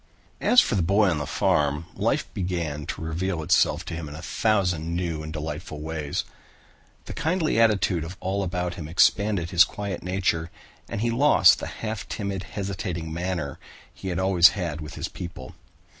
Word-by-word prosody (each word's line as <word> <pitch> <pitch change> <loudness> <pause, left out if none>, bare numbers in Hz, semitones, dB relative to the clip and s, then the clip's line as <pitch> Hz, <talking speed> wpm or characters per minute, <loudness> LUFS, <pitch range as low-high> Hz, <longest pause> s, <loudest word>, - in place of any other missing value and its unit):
As 250 - +6
for - - -1
the 100 - +2
boy 100 +3 +3
on 80 - -1
the 75 - -4
farm, 75 +2 +1
life - - 0
began 85 -6 -3
to - - -5
reveal 80 +1 -2
itself - - +2
to - - -6
him 80 -2 -5
in 75 - -8
a 80 - -8
thousand 90 -7 0
new 85 -3 -2
and 80 0 -6
delightful 75 0 -5
ways. 75 -2 -3 0.8
The - - -7
kindly 165 -5 0
attitude 100 -7 +3
of 90 +4 -8
all 95 +2 -1
about 90 -2 -2
him 85 -4 -7
expanded 95 +1 +2
his 85 -1 +7
quiet 100 0 -4
nature 90 -2 -1 0.4
and 100 - -3
he 120 0 +1
lost 140 +6 +6
the - - -5
half 110 -1 -5
timid, 100 -3 -3
hesitating 90 -5 -4
manner 85 -4 -3 0.3
he 95 - -8
had 90 -2 -2
always 95 -2 +6
had 85 -4 -3
with 75 +1 -8
his - - -3
people. 90 -2 -8
90 Hz, 175 wpm, -25 LUFS, 80-100 Hz, 0.8 s, his